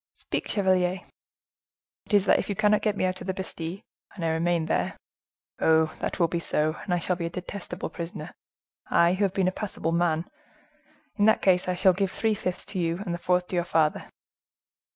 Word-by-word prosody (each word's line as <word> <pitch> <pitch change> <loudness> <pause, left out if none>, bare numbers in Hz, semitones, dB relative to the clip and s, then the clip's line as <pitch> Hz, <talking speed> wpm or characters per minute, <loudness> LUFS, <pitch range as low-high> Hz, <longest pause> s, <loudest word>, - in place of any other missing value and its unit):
"Speak, - - -4
chevalier!" 185 -2 +1 1.1
"It 210 - +2
is 200 -1 +4
that - - +4
if - - -4
you 200 - -1
cannot 210 +2 +3
get 210 -2 0
me - - +1
out 185 0 -2
of - - -7
the 190 - -1
Bastile, 185 0 -5 0.3
and 175 -5 -4
I - - +2
remain 165 0 +1
there—Oh! 160 0 -1
that - - -3
will 170 - +4
be 170 +1 -2
so, 155 -1 0
and 195 - -5
I 175 - +3
shall 180 +1 0
be 170 -1 -3
a - - -4
detestable 180 +1 -6
prisoner; 170 +3 -6 0.6
I, 170 +1 +4
who 190 +2 0
have 190 - -1
been 190 -2 +2
a - - +2
passable 185 -4 -3
man,—in 285 - -3
that 220 - +4
case, 180 -2 +3
I 180 - 0 0.2
give 195 +1 0
three 220 +3 0
fifths 185 -3 -3
to 190 - -2
you, 170 -1 0
and 175 - -2
the 175 - -4
fourth 180 0 +1
to - - -3
your 175 - +2
father." 160 -3 +1
180 Hz, 200 wpm, -27 LUFS, 170-195 Hz, 1.1 s, is